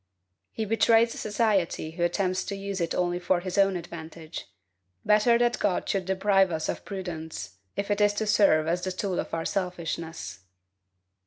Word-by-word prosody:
He 220 - -3
betrays 225 +2 +4
society 205 -7 0
who 170 +2 -7
attempts 185 +2 +1
to 200 - -4
use 195 -1 -4
it 165 - -1
only 175 0 0
for 180 0 +1
his 185 0 -4
own 195 -1 +4
advantage; 165 -1 -8 0.6
better 215 +3 +5
that 240 0 +1
God 195 -3 0
should 195 -2 0
deprive 190 0 +3
us 160 -1 -2
of - - -3
prudence, 160 - -6 0.2
if 200 +1 -2
it 205 0 +1
is 205 0 +4
to 215 +1 -1
serve 195 -7 +4
as 170 +2 0
the 185 - -1
tool 185 0 -2
of - - -4
our 165 0 -2
selfishness. 165 - -3
185 Hz, 170 wpm, -27 LUFS, 170-205 Hz, 0.6 s, better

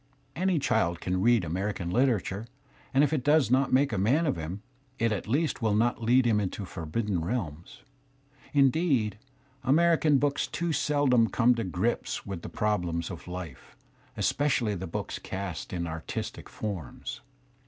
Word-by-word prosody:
Any 185 0 +1
child 85 - +1
can 90 0 -1
read 115 -1 +4
America 95 +4 -2
literature, 110 0 0 0.4
and 135 +2 +4
if 150 - +2
it 140 -5 0
does 145 -3 +4
not 130 +1 +3
make 135 -1 +3
a 100 - 0
man 135 - +3
of 145 - +1
him, 85 +5 -6 0.3
it 115 -2 +1
at 105 - -3
least 145 +5 0
will 110 -2 +2
not 120 +2 +1
lead 125 +3 +4
him 110 -3 +3
into 100 0 -3
forbidden 90 +2 -2
realms. 85 -2 -4 0.7
Indeed, 135 - +2 0.4
American? 155 +1 +4
books 140 +1 0
too 170 -1 -2
seldom 135 -7 +3
come 125 +1 +4
to 115 -1 -2
grips 95 +6 -2
with 95 -4 -5
the - - -7
problems 90 -5 -1
of 85 - -9
life, 90 -6 -8 0.4
especially 130 -7 +1
the 95 -1 -4
books 80 - -4
cast 95 -3 -5
in 85 -2 -2
artistic 80 -1 -5
forms. 100 -7 -6
110 Hz, 155 wpm, -28 LUFS, 90-135 Hz, 0.7 s, read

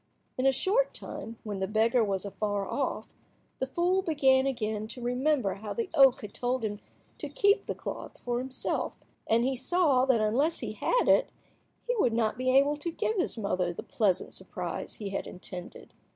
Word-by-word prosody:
In 260 +1 +1
a - - +6
short 395 - +1
time, 225 0 -7
when 205 -3 -4
the 190 - -1
beggar 225 +3 +3
was 195 -2 -1
afar 205 0 -2
off, 275 +7 -3 0.5
the 265 - -1
fool 350 +6 +1
began 275 -6 +3
again 215 -4 -2
to 250 - -6
remember 250 -2 +1
how 210 +1 -6
the 455 -5 -3
oak 270 -4 +6
had 205 -1 -8
told 245 -1 -1
him 205 -1 -3 0.4
to - - -4
keep 410 -3 +2
the - - -2
cloth - - -7
for 240 -1 -2
himself, 260 +1 -2 0.3
and 230 +1 +3
he 265 0 +1
saw 270 -1 +3
that 260 -4 +3
unless 250 +10 +2
he - - -4
had - - +1
it - - +4 0.5
he - - 0
would 245 - +3
not 225 -2 +1
be 255 +1 -1
able 280 +3 +4
to 300 +4 -3
give 435 +6 -1
his 360 - 0
mother 185 -4 0
the 170 - -7
pleasant 200 -5 0
surprise - - -5
he 205 -2 -5
had 195 - -3
intended. 180 0 -8
250 Hz, 190 wpm, -29 LUFS, 215-285 Hz, 0.5 s, a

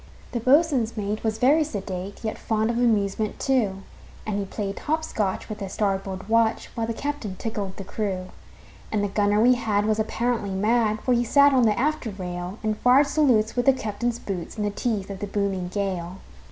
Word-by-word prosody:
The 240 - -2
boatswain's 255 -3 +3
mate 210 +1 -2
was 220 -1 0
very 285 +7 +4
sedate, 195 -7 -6
Yet 220 - -3
fond 220 0 0
of 235 - -2
amusement, 215 -3 +1
too; 210 -8 0 0.4
And 205 -2 -1
he 200 - -2
played 200 0 -4
hop 315 +1 -1
scotch 205 -10 -2
with 215 -1 -6
the 195 -2 -5
starboard 195 -1 -2
watch, 225 0 +2
While 225 -2 -2
the 230 - -1
captain 280 -9 -4
tickled 200 -2 -4
the 195 - -5
crew. 190 -2 -3 0.6
And 210 -1 0
the - - +1
gunner 205 +1 +2
we 245 +3 +6
had 215 -4 0
was 215 0 +1
apparently 225 -1 -1
mad, 215 +2 +1
For 255 - +2
he 240 0 +3
sat 280 +4 +5
on 255 -3 +4
the 210 - +1
after 295 -3 0
rail, 180 -1 -5
And 215 -1 -1
fired 255 +4 +5
salutes 260 -7 +2
with 245 +1 0
the 270 - +8
captain's 230 0 -2
boots, 190 -1 -6
In 210 - -1
the 205 - 0
teeth 205 -3 -2
of 195 - -6
the 205 - -4
booming 195 -3 -1
gale. 185 -2 -3
215 Hz, 200 wpm, -25 LUFS, 200-240 Hz, 0.6 s, the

